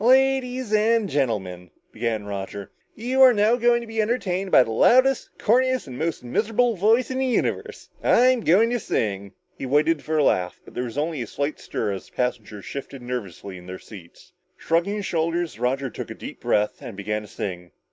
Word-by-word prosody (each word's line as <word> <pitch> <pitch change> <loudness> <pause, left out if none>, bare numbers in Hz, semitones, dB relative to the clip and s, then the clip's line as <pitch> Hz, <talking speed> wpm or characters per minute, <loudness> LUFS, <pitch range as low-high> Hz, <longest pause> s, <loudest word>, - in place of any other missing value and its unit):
"Ladieeees 260 -2 +3
and 220 0 +3
Gentlemen," 100 - -2 0.2
began 110 -2 -2
Roger. 100 -1 -6 0.2
"You 250 +4 0
are 260 -1 +9
now 210 +3 +4
going 240 0 +3
to - - -7
be 225 -1 -1
entertained 195 -4 -1
by 130 - +7
the 115 - -6
loudest, 255 - +4
corniest 255 +3 +2
and 130 -3 -9
most 160 +2 -2
miserable 225 - +1
voice 225 +7 +2
in 260 - -2
the 265 - +1
universe. 250 - -2 0.2
I'm 255 +1 +4
going 215 +6 +4
to 245 - 0
sing!" 100 - -2 0.2
He 135 - -6
waited 150 +3 +2
for 155 0 -1
a 150 - +4
laugh, 90 -8 +1
but - - -14
there 125 - -3
was 120 +2 -7
only 155 -1 -1
a 115 - -4
slight 145 +6 -3
stir 105 - -3
as 95 -1 -6
the - - -24
passengers 110 -5 -3
shifted 135 -2 -7
nervously 100 -6 -6
in 90 - -14
their 95 0 -6
seats. 100 - -14 0.2
Shrugging 170 +5 0
his 205 -2 -4
shoulders, 165 - -1
Roger 130 +1 -1
took - - -7
a - - -7
deep - - -9
breath 105 0 0
and 115 -5 -8
began 105 +1 -2
to 105 - -11
sing. 90 -3 -6
155 Hz, 200 wpm, -24 LUFS, -, 0.2 s, are